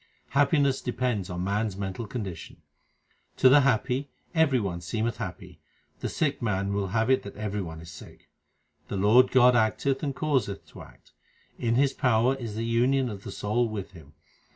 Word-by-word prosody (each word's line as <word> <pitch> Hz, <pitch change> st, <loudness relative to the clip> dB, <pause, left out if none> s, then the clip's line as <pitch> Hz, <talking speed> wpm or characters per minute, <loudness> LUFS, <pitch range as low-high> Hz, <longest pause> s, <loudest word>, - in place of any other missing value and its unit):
Happiness 140 Hz, -1 st, +2 dB
depends 125 Hz, -6 st, -2 dB
on 90 Hz, 0 st, -4 dB
man 105 Hz, +3 st, 0 dB
s 100 Hz, -, -6 dB
mental 100 Hz, +3 st, -5 dB
condition: 100 Hz, -8 st, -7 dB, 0.7 s
To 130 Hz, -, +6 dB
the 140 Hz, +3 st, +7 dB
happy 130 Hz, +2 st, 0 dB, 0.2 s
every 160 Hz, -6 st, +3 dB
one 90 Hz, -5 st, -3 dB
seemeth 110 Hz, +6 st, -2 dB
happy; -, -, -7 dB, 0.4 s
the -, -, -3 dB
sick 145 Hz, -3 st, -1 dB
man 100 Hz, -3 st, -1 dB
will 100 Hz, -1 st, -1 dB
have 110 Hz, +6 st, +1 dB
it 130 Hz, -, +3 dB
that 100 Hz, -, -10 dB
every 105 Hz, -1 st, -3 dB
one 80 Hz, -3 st, -7 dB
is 85 Hz, 0 st, -11 dB
sick. 75 Hz, -, -14 dB, 0.6 s
The 100 Hz, -, -4 dB
Lord 110 Hz, +6 st, +5 dB
God 125 Hz, -1 st, +6 dB
acteth 120 Hz, +4 st, +1 dB
and 140 Hz, -3 st, -2 dB
causeth 135 Hz, -11 st, -1 dB
to -, -, -12 dB
act; -, -, -17 dB, 0.5 s
in 115 Hz, 0 st, +1 dB
His 140 Hz, +2 st, +3 dB
power 125 Hz, -1 st, +2 dB
is 120 Hz, -6 st, -6 dB
the 115 Hz, +1 st, -2 dB
union 125 Hz, +3 st, +2 dB
of 100 Hz, -1 st, -8 dB
the -, -, -7 dB
soul 115 Hz, +3 st, 0 dB
with 100 Hz, -3 st, -6 dB
Him. 80 Hz, -6 st, -15 dB
115 Hz, 180 wpm, -27 LUFS, 100-130 Hz, 0.7 s, the